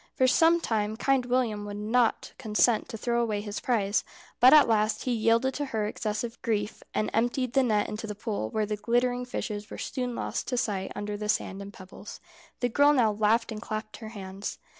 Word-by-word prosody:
For 260 Hz, -, +3 dB
some 325 Hz, +6 st, +5 dB
time 220 Hz, -6 st, -1 dB
Kind 265 Hz, 0 st, +1 dB
William 240 Hz, -4 st, 0 dB
would 205 Hz, 0 st, -6 dB
not 225 Hz, +3 st, +1 dB
consent 220 Hz, -1 st, +2 dB
to 225 Hz, -, -6 dB
throw 235 Hz, +2 st, 0 dB
away 215 Hz, -3 st, -1 dB
his 205 Hz, 0 st, -5 dB
prize, 210 Hz, -5 st, +1 dB, 0.4 s
but 255 Hz, +1 st, +8 dB
at 305 Hz, -1 st, +8 dB
last 215 Hz, -1 st, +1 dB
he 255 Hz, -, -1 dB
yielded 230 Hz, +3 st, +2 dB
to 290 Hz, -, -2 dB
her 220 Hz, -6 st, -2 dB
excessive 215 Hz, +2 st, -4 dB
grief, 210 Hz, -2 st, -2 dB
and 215 Hz, -, 0 dB
emptied 245 Hz, +2 st, 0 dB
the 270 Hz, -, +4 dB
net 215 Hz, -5 st, +1 dB
into 220 Hz, +1 st, -5 dB
the 210 Hz, -, -5 dB
pool, 205 Hz, -, -3 dB
where 215 Hz, -1 st, -1 dB
the 210 Hz, 0 st, -3 dB
glittering 245 Hz, +3 st, 0 dB
fishes 210 Hz, -4 st, -5 dB
were -, -, -8 dB
soon 250 Hz, -2 st, -3 dB
lost -, -, -3 dB
to 250 Hz, -, -1 dB
sight 200 Hz, -5 st, -1 dB
under 205 Hz, 0 st, -4 dB
the 210 Hz, 0 st, -5 dB
sand 200 Hz, -2 st, -1 dB
and 200 Hz, 0 st, -8 dB
pebbles. 190 Hz, +1 st, -11 dB, 0.4 s
The 245 Hz, -, +1 dB
girl 285 Hz, +4 st, +5 dB
now 235 Hz, -6 st, +3 dB
laughed 220 Hz, +3 st, +1 dB
and 215 Hz, -1 st, -6 dB
clapped 215 Hz, -1 st, -5 dB
her 220 Hz, -, -8 dB
hands. 195 Hz, -2 st, -6 dB
220 Hz, 205 wpm, -28 LUFS, 210-245 Hz, 0.4 s, but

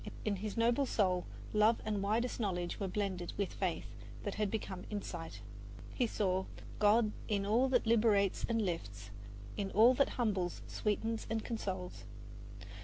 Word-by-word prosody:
In 205 Hz, -2 st, +1 dB
his 210 Hz, +3 st, -4 dB
noble 235 Hz, +4 st, +3 dB
soul 185 Hz, -6 st, +1 dB, 0.3 s
love 215 Hz, +2 st, +4 dB
and 210 Hz, -2 st, 0 dB
widest 225 Hz, +6 st, 0 dB
knowledge 180 Hz, -5 st, -1 dB
were 195 Hz, -, -1 dB
blended 185 Hz, -2 st, -2 dB
with 200 Hz, -2 st, -1 dB
faith 185 Hz, -4 st, -2 dB, 0.4 s
that 205 Hz, -, -2 dB
had 210 Hz, -1 st, 0 dB
become 190 Hz, -3 st, -4 dB
insight. 170 Hz, -, -5 dB, 0.5 s
He 245 Hz, -, +1 dB
saw 190 Hz, -3 st, 0 dB, 0.3 s
God 215 Hz, +1 st, +5 dB, 0.2 s
in 200 Hz, -2 st, 0 dB
all 235 Hz, +6 st, +3 dB
that 250 Hz, -2 st, +3 dB
liberates 215 Hz, -4 st, +3 dB
and 225 Hz, -1 st, +2 dB
lifts, 105 Hz, -, -4 dB, 0.5 s
In 200 Hz, -1 st, -1 dB
all 225 Hz, +6 st, +6 dB
that 275 Hz, +2 st, +3 dB
humbles, 195 Hz, -7 st, 0 dB
sweetens 225 Hz, +1 st, -1 dB
and 225 Hz, -1 st, -1 dB
consoles. 190 Hz, -6 st, -4 dB
205 Hz, 150 wpm, -34 LUFS, 185-225 Hz, 0.5 s, all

